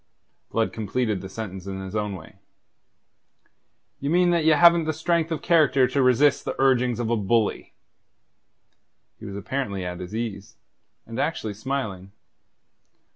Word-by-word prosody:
Blood 115 -1 0
completed 110 -1 -2
the 95 - -8
sentence 95 -3 -7
in 95 -1 -5
his 95 +1 -7
own 105 -2 -2
way: 85 - -13 1.6
"Ye 140 - -3
mean 175 +2 +3
that 170 -2 +2
ye 160 - +4
haven't 170 +1 +6
the 155 - -1
strength 165 +1 0
of 160 - -3
character 150 -6 +4
to 135 +2 +1
resist 130 +3 +3
the - - -5
urgings 125 -3 +2
of 115 -1 -1
a - - +3
bully." 110 +1 0 1.4
He - - -10
was 100 - -7
apparently 100 -3 -3
at 90 0 -5
his 90 +3 -7
ease, 110 -1 -5 0.5
and 115 +2 -7
actually 135 -8 -2
smiling. 105 -5 -4
115 Hz, 150 wpm, -24 LUFS, 100-140 Hz, 1.6 s, haven't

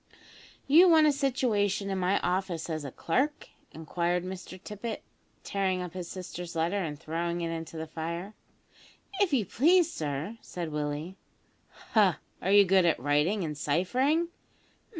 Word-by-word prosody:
"You 335 +6 +7
want 320 -2 +6
a 300 - +5
situation 215 -8 0
in 190 - -1
my 185 +2 +2
office 180 -2 -1
as 155 -1 -3
a 140 - -5
clerk?" 270 - -1 0.2
inquired 170 +3 -1
Mr 185 0 -7
Tippet, 210 +3 -6 0.4
tearing 190 -2 0
up 175 -2 -7
his 180 -2 -5
sister's 180 -2 -7
letter, 170 +5 0
and 150 -3 -5
throwing 170 +2 -2
it 165 -1 -2
into 165 0 -6
the 160 - -4
fire. 170 +5 -5 0.9
"If 400 -4 +3
you 245 -7 +2
please, 330 - +3
sir," 155 +9 -4
said 170 -3 -6
Willie. 150 +5 -3 0.7
"Ha! 205 -6 +4 0.2
are 190 - 0
you 205 0 +7
good 190 0 +4
at 165 - +3
writing 150 - +1
and 150 -2 -3
ciphering?" 250 - +1
185 Hz, 150 wpm, -29 LUFS, 165-210 Hz, 0.9 s, You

